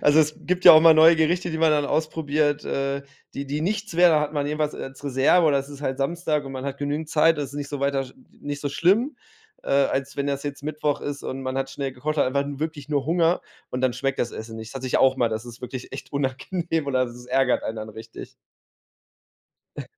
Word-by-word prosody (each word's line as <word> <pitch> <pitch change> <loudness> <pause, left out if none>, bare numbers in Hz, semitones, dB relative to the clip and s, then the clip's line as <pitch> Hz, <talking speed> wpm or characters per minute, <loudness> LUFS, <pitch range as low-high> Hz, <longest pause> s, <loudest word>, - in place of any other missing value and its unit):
Also, 145 +1 +5
es 155 -1 +3
gibt 180 +1 -1
ja - - +12
auch 155 - +8
mal 165 0 +8
neue 160 +2 +7
Gerichte, 175 +3 +1
die 160 - -3
man 160 -1 +4
dann 150 -1 +2
ausprobiert, 155 -1 0
äh, 140 0 -2 0.3
die 140 - -5
die 145 +2 -3
nichts 205 +1 -2
werden, 175 -1 +6
da 150 - +4
hat 150 0 -2
man 145 -2 -1
jedenfalls 150 0 -1
als 135 +2 -9
Reserve 140 +5 +3
oder 140 -2 +3
es 135 - -5
ist 145 0 -10
halt 135 -1 -2
Samstag 150 0 -1
und 135 - -7
man 130 0 -6
hat 140 -1 -4
genügend 145 +2 -3
Zeit, 160 0 +3
das 145 - -2
ist - - -14
nicht 145 -1 -5
so 145 -1 -4
weiter 140 0 0
n 135 - -4
n - - -16 0.3
nicht 145 0 -5
so 145 - -2
schlimm, 210 - +2 0.5
äh, - - -9
als 140 0 +1
wenn 140 0 -1
das 140 -1 -2
jetzt 145 -1 -6
Mittwoch 150 -1 -1
ist 145 0 -5
und 135 0 -5
man 130 0 -3
hat 135 0 -2
schnell 135 -1 -4
gekocht, 155 +5 -3
hat 140 - +3
einfach 140 +2 +1
'n 140 -1 -6
wirklich 155 -2 -5
nur 140 -2 -1
Hunger 170 +1 +2 0.3
und 125 - -3
dann 130 -2 +2
schmeckt 135 +2 -2
das 120 - -1
Essen 110 0 -8
nicht. 110 0 -8
Das - - -13
hatte 130 - -6
ich - - +1
auch 130 0 +4
mal, 120 - +2
das 110 +1 -4
ist 120 0 -11
wirklich 125 0 -7
echt 135 - -8
unangenehm 145 +4 -2
oder 130 -2 +1
das 120 +1 -11
ärgert 130 0 +2
einen 110 - -4
dann 110 0 -6
richtig. 110 +1 -10 1.5
Äh - - -5
145 Hz, 250 wpm, -24 LUFS, 135-155 Hz, 1.5 s, ja